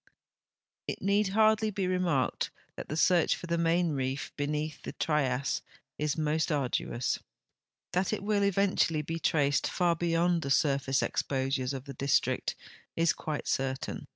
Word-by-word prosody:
It - - -3
need 200 +2 +2
hardly 215 +2 +3
be 195 -2 -2
remarked 180 -7 0 0.3
that - - -8
the 155 - -3
search 175 -1 +4
for - - -8
the 170 0 0
Main 170 0 +2
Reef 135 -1 -2
lieneath 150 +1 -2
the - - -7
Trias 140 -4 0 0.4
is 150 0 0
most 155 +1 0
arduous. 130 -3 -1 0.7
That 180 +1 +1
it 215 -2 -2
will 205 0 +1
eventually 195 -5 +2
be 165 +2 -4
traced 145 -3 +2
far 175 -2 +1
beyond 170 +1 +1
the 140 - -4
surface 135 -2 +2
exposures 135 -1 -1
of 135 -1 -5
the 140 - -7
district 140 +2 +1 0.4
is 165 0 +3
quite 155 -2 -4
certain. 135 0 -2
155 Hz, 150 wpm, -30 LUFS, 140-180 Hz, 0.7 s, search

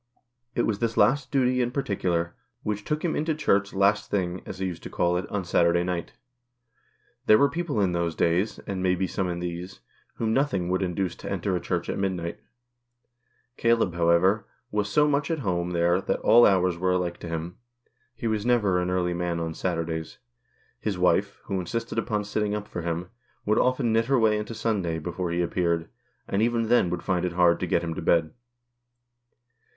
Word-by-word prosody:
It 120 - +2
was 105 -2 0
this 115 -1 -1
last 135 0 +3
duty 130 -2 +2
in 120 - +1
particular, 90 -10 -1 0.3
which 105 -1 -2
took 150 - -2
him 165 - 0
into 155 +1 0
Church 100 -9 +1
"last 100 +2 +2
thing," 90 -2 -1
as - - -6
he 95 - -2
used 90 -2 -4
to - - -8
call 90 0 +1
it, 90 - -2
on 100 -3 -2
Saturday 85 0 +3
night. 90 -1 -3 1.1
There 110 - +8
were 140 +3 +3
people 165 -8 -2
in 95 -3 +2
those 85 -2 -1
days, 90 +6 +1
and 95 -2 -3
may 90 0 +2
be 95 +1 0
some 95 0 -2
in 85 0 -3
these, 90 -3 -6 0.3
whom 110 -1 -1
nothing 120 -11 +1
would 95 +1 +1
induce 90 0 -1
to - - -7
enter 95 -2 -1
a - - 0
Church - - -2
at - - -3
mid 95 -1 0
night; 85 -1 -5 1.2
Caleb, 115 -6 +2
however, 85 +5 +3 0.2
was 105 0 0
so 150 +8 +4
much 145 0 +1
at 165 - 0
home 90 -2 0
there 85 +1 +2
that - - -1
all 120 +1 +7
hours 90 -3 +2
were 90 0 +2
alike 90 -1 -1
to 85 - -7
him. 85 +2 -4 0.6
He - - -7
was 110 -2 0
never 105 -7 +2
an 90 - -1
early 90 -1 0
man 85 -1 -2
on 80 -1 -3
Saturdays. 80 -2 -3 0.6
His 100 -4 -2
wife, 95 +3 +2
who 95 -2 -2
insisted 115 +6 -3
upon 105 -2 -1
sitting 105 0 -1
up 105 0 -5
for 85 - -5
him, 85 +2 -3 0.3
would 105 +1 +2
often 125 -3 +2
knit 115 +1 +3
her 135 +2 +2
way 110 -2 +3
into 105 +2 -5
Sunday 95 -8 -1
before 85 +2 -3
he 85 +1 0
appeared, 85 -1 0 0.4
and 100 - 0
even 115 -1 +1
then 120 -7 +4
woiild 90 - -3
find 90 -3 0
it 90 -1 -1
hard 85 -1 +4
to 90 - -2
get 85 - +1
him 85 -1 -2
to - - -5
bed. 80 -2 +2
95 Hz, 200 wpm, -26 LUFS, 85-110 Hz, 1.2 s, There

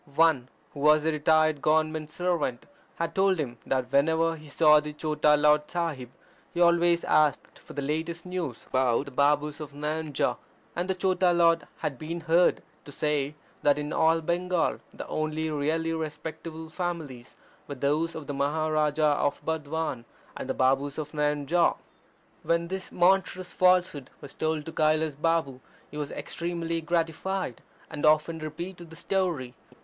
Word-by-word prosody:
One, 155 -6 +3 0.2
who 145 - -9
was 150 +1 +4
a 160 - +3
retired 155 -1 +2
Government 155 0 +1
servant, 165 -8 -2 0.3
had 165 0 -3
told 190 -1 +3
him 125 -6 -4
that 130 -1 -1
whenever 160 +4 +2
he 155 -1 -13
saw 150 +1 +5
the 150 0 -6
Chota 150 0 +2
Lord 150 0 +3
Sahib 165 -8 -3 0.4
he - - -5
always 170 0 +4
asked 150 -3 +1
for - - -13
the 145 - -3
latest 160 +4 -3
news 175 -9 -4
about 130 0 +1
the 140 - -9
Babus 145 +2 +1
of 150 -2 -8
Nayanjore, 150 0 -2 0.4
and 175 +2 -2
the 190 - +1
Chota 185 -1 +2
Lard 165 -2 +3
had 135 -4 -3
been 165 +2 -5
heard 165 +2 +3 0.2
to 145 - -10
say 150 0 -1 0.3
that 145 0 +3
in 150 0 -3
all 165 +1 +3
Bengal 175 +1 0
the - - -8
only 155 0 -2
really 160 +3 0
respectable 160 +1 -6
families 160 -8 -5 0.3
were 145 - -5
those 150 +5 0
of 155 - -6
the 145 - -4
Maharaja 150 +1 +1
of 145 0 -1
Burdwan 160 -5 -3 0.3
and 130 - -6
the - - -1
Babus 135 +2 +1
of 155 -2 -5
Nayanjore. 150 +2 +1 0.6
When 170 0 0
this 190 0 -5
monstrous 185 0 +2
falsehood 180 -7 +2
was 140 - -10
told 155 -1 -2
to 165 - -6
Kailas 155 0 +2
Balm 150 -3 0 0.3
he 150 - -8
was 145 -1 -3
extremely 170 -1 -4
gratified, 165 -2 -2 0.3
and 150 -3 -7
often 155 +2 +3
repeated 170 +3 -7
the 160 - -12
story. 170 -11 -1
155 Hz, 155 wpm, -27 LUFS, 145-165 Hz, 0.6 s, saw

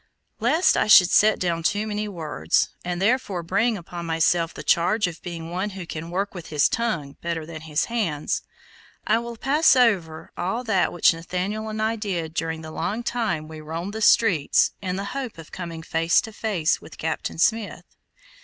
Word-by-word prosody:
Lest 295 +11 +3
I - - +2
should 185 -4 +8
set 215 0 +5
down 170 -2 -1
too 205 +6 0
many 210 0 -3
words, 155 - 0
and 175 0 -3
therefore 200 -4 0
bring 225 +6 +1
upon 170 -1 -7
myself 165 +1 +2
the - - -9
charge 200 +6 +2
of 175 -2 -5
being 170 -2 -7
one 185 +4 -2
who 180 - -6
can 165 0 -6
work 195 +3 -2
with 175 -3 -8
his 150 -2 +3
tongue 190 -12 -2
better 165 -2 -3
than 165 0 -8
with 155 - -11
his 150 0 0
hands, 200 -11 -1 0.6
I 220 +2 +3
will 235 0 -7
pass 290 +5 +4
over 190 -11 +1
all 195 +8 -2
that 210 -6 +1
which 175 - +4
Nathaniel 185 +6 -3
and 215 0 -5
I 220 +1 0
did 175 -7 -3
during 160 -1 -3
the 155 - -8
long 215 +8 -3
time 220 -12 -2
we 155 0 -9
roamed 165 +6 -5
the 220 - -5
streets, 185 -10 +4
in 185 -2 -2
the 195 +1 -3
hope 265 -7 -5
of 165 -1 -12
coming 170 -3 -6
face 165 +1 +2
to 225 -3 -9
face 200 -8 0
with - - -13
Captain 160 0 -3
Smith. 220 +5 0
180 Hz, 190 wpm, -24 LUFS, 165-220 Hz, 0.6 s, should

